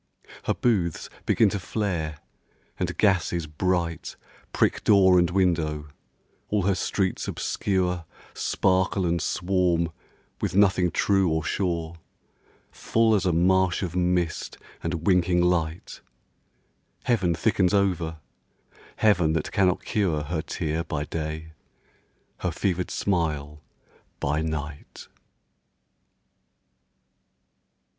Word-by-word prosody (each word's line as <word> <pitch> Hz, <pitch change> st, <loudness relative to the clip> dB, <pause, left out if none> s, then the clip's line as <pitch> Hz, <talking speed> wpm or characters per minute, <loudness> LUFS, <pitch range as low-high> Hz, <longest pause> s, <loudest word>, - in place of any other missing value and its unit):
Her -, -, +1 dB
booths 95 Hz, -10 st, 0 dB, 0.2 s
begin 110 Hz, -, +4 dB
to 100 Hz, -, -3 dB
flare; 85 Hz, -6 st, -2 dB, 0.6 s
and -, -, -2 dB
gases 90 Hz, -5 st, +2 dB
bright 85 Hz, +1 st, -2 dB, 0.4 s
Prick -, -, +1 dB
door 95 Hz, -3 st, +6 dB
and 85 Hz, -1 st, +2 dB
window; 80 Hz, -5 st, 0 dB, 0.6 s
all 105 Hz, -2 st, +1 dB
her 100 Hz, +1 st, +2 dB
streets 95 Hz, 0 st, -1 dB
obscure 90 Hz, -3 st, -1 dB, 0.3 s
Sparkle 95 Hz, 0 st, +1 dB
and 85 Hz, -1 st, 0 dB
swarm 90 Hz, -3 st, +1 dB, 0.5 s
with -, -, -1 dB
nothing 95 Hz, -3 st, +4 dB
true 95 Hz, +1 st, +2 dB
or 80 Hz, 0 st, 0 dB
sure, 85 Hz, -1 st, -2 dB, 0.7 s
Full 115 Hz, -1 st, +2 dB
as 100 Hz, -2 st, +2 dB
a -, -, +3 dB
marsh 95 Hz, +2 st, +2 dB
of 90 Hz, -2 st, -4 dB
mist 90 Hz, -2 st, 0 dB, 0.2 s
and 85 Hz, 0 st, -3 dB
winking 90 Hz, -2 st, +3 dB
light; 85 Hz, -2 st, -1 dB, 1.0 s
Heaven 95 Hz, -8 st, +1 dB
thickens 95 Hz, +1 st, +2 dB
over, 90 Hz, -5 st, +1 dB, 0.8 s
Heaven 90 Hz, -7 st, +3 dB
that 80 Hz, -2 st, -2 dB
cannot 95 Hz, -2 st, +1 dB
cure 85 Hz, -8 st, 0 dB
Her 80 Hz, +2 st, -2 dB
tear 80 Hz, 0 st, -3 dB
by 75 Hz, -3 st, -3 dB
day, 80 Hz, +1 st, -5 dB, 0.9 s
her 90 Hz, -, -1 dB
fevered 90 Hz, +1 st, -1 dB
smile 75 Hz, -5 st, -1 dB, 0.6 s
by 75 Hz, +3 st, 0 dB
night. 75 Hz, -2 st, -6 dB
90 Hz, 105 wpm, -25 LUFS, 80-95 Hz, 1.0 s, door